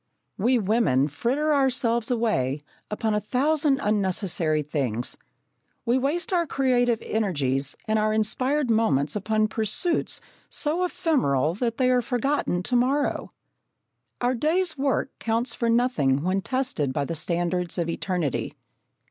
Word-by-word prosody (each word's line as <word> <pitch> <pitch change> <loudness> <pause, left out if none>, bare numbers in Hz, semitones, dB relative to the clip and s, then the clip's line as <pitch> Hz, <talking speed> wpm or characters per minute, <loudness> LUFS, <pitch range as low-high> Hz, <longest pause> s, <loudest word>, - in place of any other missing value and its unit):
We 245 +6 +2
women 190 - +2
fritter 270 - 0
ourselves 245 -4 +1
away 155 - 0 0.3
upon 215 +1 -1
a 210 - +2
thousand 280 +5 +1
unnecessary 185 -6 +1
things. 130 -6 -2 0.7
We 245 +2 +2
waste 310 +8 -1
our 340 -2 +2
creative 245 -4 +2
energies 145 -10 -1
and 215 0 +2
our 215 0 +1
inspired 255 +5 +1
moments 155 -11 +2
upon 215 +1 +1
pursuits 220 - -1 0.3
so 320 +4 0
ephemeral 275 - +1
that 230 +3 -2
they 255 -1 +3
are 250 -1 +3
forgotten 245 -6 -1
to 250 - -1
morrow. 270 +4 +1 0.9
Our 245 +1 +2
day's 320 +7 +1
work 275 -1 0
counts 230 +1 0
for 235 0 -1
nothing 190 - +2
when 185 +2 0
tested 250 - -1
by 140 0 -1
the 165 - -4
standards 175 +2 -2
of 170 -2 0
eternity. 170 -4 -2
225 Hz, 130 wpm, -25 LUFS, 175-260 Hz, 0.9 s, they